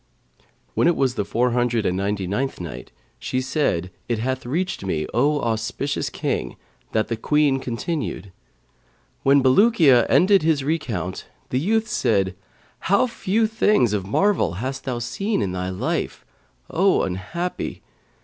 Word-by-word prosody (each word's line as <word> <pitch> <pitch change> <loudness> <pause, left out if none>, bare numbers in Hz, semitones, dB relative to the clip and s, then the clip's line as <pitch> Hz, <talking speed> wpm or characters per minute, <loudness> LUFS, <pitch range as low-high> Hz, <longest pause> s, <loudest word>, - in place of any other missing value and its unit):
When - - +2
it 175 - +3
was 130 -2 +1
the 105 - -1
Four 120 +5 0
Hundred 120 -2 +1
and 90 - +1
Ninety 100 0 -1
ninth 115 +9 -2
Night, 85 -3 -7 0.3
She 130 - -2
said, 130 - -1 0.2
It 120 - +1
hath 130 +2 -3
reached 175 - -2
me, 80 -5 -1
O 145 +5 +2
auspicious 115 +5 -2
King, - - -3 0.4
that 110 -1 +1
the 115 - -1
Queen 145 +3 +2
continued: 125 - -4 0.9
"When 140 0 +4
Bulukiya 140 - +5
ended 195 +1 +5
his 155 -3 +1
recount, 115 - -3 0.2
the 125 - +1
youth 220 +8 +1
said, 105 - +1 0.4
'How 200 +7 +3
few 225 -2 0
things 210 - +2
of 95 -2 -2
marvel 185 - +2
hast 130 +8 -4
thou 125 -2 -2
seen 195 - -2
in 100 -4 -1
thy 90 0 -3
life, 95 - -3 0.5
O 190 +3 +3
unhappy! 130 - -4
130 Hz, 145 wpm, -23 LUFS, 105-165 Hz, 0.9 s, Bulukiya